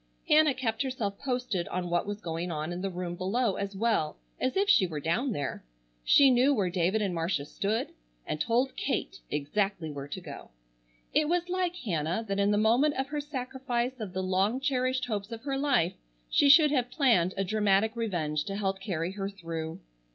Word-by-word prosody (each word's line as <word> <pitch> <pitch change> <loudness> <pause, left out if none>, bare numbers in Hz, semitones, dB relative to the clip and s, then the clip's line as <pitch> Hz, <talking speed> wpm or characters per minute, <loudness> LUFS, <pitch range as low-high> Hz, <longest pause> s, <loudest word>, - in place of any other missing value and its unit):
Hannah 300 -2 +5
kept 230 -3 -1
herself 235 -7 -2
posted 250 -9 -2
on 180 -1 -3
what 175 +3 +1
was 205 +1 -4
going 165 +1 -3
on 155 +2 -3
in 175 - -5
the 195 - -1
room 180 -1 -4
below 195 +5 0
as 200 0 -4
well 200 -8 0 0.2
as 255 +7 0
if 400 +1 +2
she 200 - +5
were 155 -3 -4
down 215 - 0
there. 145 -9 -3 0.4
She 275 - +6
knew 255 +3 +4
where 190 -6 0
David 185 +4 +1
and 195 -3 -1
Marcia 165 -3 -1
stood, 205 +8 -2 0.4
and 150 - -3
told 245 +3 +1
Kate 275 - -2
exactly 160 +3 -1
where 140 -1 -6
to - - -5
go. - - -10 0.6
It 305 0 +3
was 350 +1 0
like 360 -1 0
Hannah 180 - -2
that 200 0 -1
in 200 0 +3
the 205 - +3
moment 240 +8 +3
of 265 +1 -2
her 295 0 -2
sacrifice 255 -2 -3
of 205 -5 -5
the 190 0 -2
long 190 +6 +1
cherished 260 -2 0
hopes 210 -2 -4
of 225 -1 -7
her 275 -1 -2
life 270 - +2 0.4
she 285 - +5
should 300 +1 +8
have 250 -4 +1
planned 215 - +2
a 195 - +1
dramatic 210 +2 +2
revenge 160 -10 -1
to 195 - -4
help 195 -1 -1
carry 175 -3 -2
her 195 0 -4
through. 165 -4 -6
210 Hz, 195 wpm, -29 LUFS, 180-255 Hz, 0.6 s, should